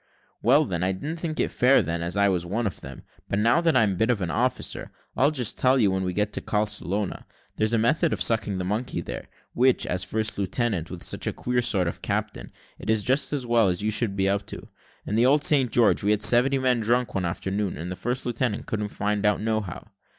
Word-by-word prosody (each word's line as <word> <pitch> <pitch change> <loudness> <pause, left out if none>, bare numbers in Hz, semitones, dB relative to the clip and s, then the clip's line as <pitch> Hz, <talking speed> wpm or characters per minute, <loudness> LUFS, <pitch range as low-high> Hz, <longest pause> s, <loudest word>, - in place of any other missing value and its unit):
"Well, 140 +7 +4
then, 90 -8 -3
I 95 +1 +1
didn't 150 - -5
think 160 -2 -4
it - - 0
fair 130 +3 +4
then, 85 +1 -3
as 85 +3 -3
I 100 0 +4
was 90 -3 0
one 105 +7 -2
of 100 - -4
them. 70 -1 -10 0.3
But 100 - -1
now 115 +9 +3
that 165 -5 +3
I'm 110 -4 +3
a - - -3
bit 110 +3 +1
of 120 -4 +2
an 90 -4 -2
officer, 125 +5 -2 0.3
I'll 140 - +3
just 130 -8 -1
tell 130 +1 +4
you 110 -6 +3
that - - -1
when 95 0 -1
we 90 - -1
get 105 +3 -1
to - - -2
Carlscrona, 105 -2 -2 0.3
there's 110 +1 +1
a - - +3
method 150 +8 +2
of - - -2
sucking 110 -4 +1
the 90 - -3
monkey 105 +7 -2
there, - - -7 0.3
which, 130 +1 +3
as 90 +1 -2
first 110 +2 -2
lieutenant, 100 -3 -1
with 90 -2 -8
such - - -2
a - - +1
queer 125 0 -1
sort 100 -7 +1
of 85 - -5
captain, - - -3 0.3
it 105 - -7
is 110 -2 +2
just 135 +6 +1
as 140 -4 -2
well 115 -3 +3
that 90 +2 -2
you 110 - +1
should 105 -2 +1
be 95 0 +1
up 100 0 -1
to. - - -9 0.4
In - - -4
the 115 +3 +4
old 145 +2 +3
St. 135 -7 +3
George 115 -2 +3
we 100 - 0
had 105 0 +2
seventy 130 +3 +5
men 130 -2 +1
drunk 120 +2 0
one 95 - -1
afternoon, 95 +3 -3
and 85 +4 -6
the - - -4
first 120 +8 -3
lieutenant 120 -2 -2
couldn't 105 -1 -3
find 105 0 -2
it - - +3
out 105 - +2
nohow." 110 -4 -3
110 Hz, 250 wpm, -25 LUFS, 95-125 Hz, 0.4 s, seventy